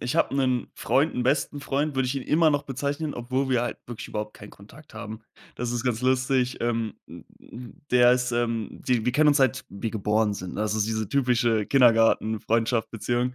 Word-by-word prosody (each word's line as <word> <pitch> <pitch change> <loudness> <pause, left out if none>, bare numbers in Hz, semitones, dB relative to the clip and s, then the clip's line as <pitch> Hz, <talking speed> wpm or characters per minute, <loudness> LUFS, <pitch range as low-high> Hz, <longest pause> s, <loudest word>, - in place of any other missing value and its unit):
ich 125 +6 -2
habe 150 - +2
'nen 130 -3 0
Freund 145 +4 +1
'n 125 - -1
besten 140 +2 0
Freund, 145 +1 -1
würde 130 -1 +1
ich 130 - -2
ihn 135 - -3
immer 160 +1 +3
noch 145 -1 0
bezeichnen, 145 +3 -3
obwohl 130 +3 -2
wir 125 -2 +3
halt 120 -2 -3
wirklich 120 -2 -8
überhaupt 105 0 -4
keinen 105 - -12
Kontakt 110 +7 -16
haben. 110 0 -7 0.3
Das 120 -1 -3
ist 120 -1 -2
ganz 120 -3 0
lustig. 130 0 +1
Ähm, 115 -2 -1
hm, - - -12
hm, 120 0 -11 0.2
der 125 0 +6
ist, 125 -1 0
ähm, 115 -2 -1
di 120 -3 -1
wir 125 - +1
kennen 150 +2 +4
uns 145 - +4
seit 135 -5 +1
wir 105 +3 -5
geboren 105 0 +1
sind, 90 -3 -6
ne? 105 - -2
Also, 105 0 -1
das 105 - +1
ist - - -4
diese 110 -2 -2
typische 120 -5 +1
Kindergartenfreundschaft, 115 -2 +2
Beziehung 120 +3 -1
120 Hz, 210 wpm, -25 LUFS, 110-135 Hz, 0.3 s, der